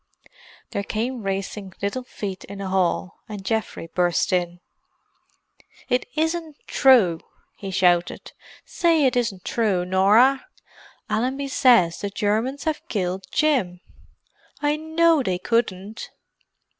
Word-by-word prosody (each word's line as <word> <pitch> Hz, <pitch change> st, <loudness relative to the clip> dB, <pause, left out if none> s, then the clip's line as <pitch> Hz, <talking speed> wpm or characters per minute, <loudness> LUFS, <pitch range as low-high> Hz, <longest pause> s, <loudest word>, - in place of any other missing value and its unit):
There -, -, -2 dB
came 230 Hz, +4 st, -3 dB
racing 195 Hz, 0 st, -4 dB
little 200 Hz, +6 st, -2 dB
feet 200 Hz, -6 st, -6 dB
in 200 Hz, -, -9 dB
the 195 Hz, -1 st, -5 dB
hall, 185 Hz, 0 st, 0 dB
and 205 Hz, -2 st, -7 dB
Geoffrey 220 Hz, -5 st, -2 dB
burst 175 Hz, +1 st, 0 dB
in. 175 Hz, -1 st, -1 dB, 1.3 s
"It 250 Hz, +1 st, +1 dB
isn't 320 Hz, -1 st, -2 dB
true!" 225 Hz, -, +4 dB, 0.4 s
he 195 Hz, -, -7 dB
shouted. 180 Hz, -2 st, +1 dB, 0.3 s
"Say 330 Hz, -4 st, +2 dB
it 255 Hz, -, +2 dB
isn't 225 Hz, -7 st, -1 dB
true, 200 Hz, -6 st, 0 dB
Norah! 210 Hz, +9 st, +4 dB, 0.6 s
Allenby 265 Hz, +5 st, -1 dB
says 235 Hz, -11 st, +4 dB
the 200 Hz, -, -2 dB
Germans 220 Hz, +7 st, -1 dB
have 315 Hz, -1 st, -2 dB
killed 185 Hz, -2 st, -3 dB
Jim—I 290 Hz, +3 st, -3 dB
know 320 Hz, 0 st, +2 dB
they 185 Hz, -7 st, -1 dB
couldn't." 205 Hz, 0 st, -2 dB
210 Hz, 115 wpm, -23 LUFS, 185-260 Hz, 1.3 s, true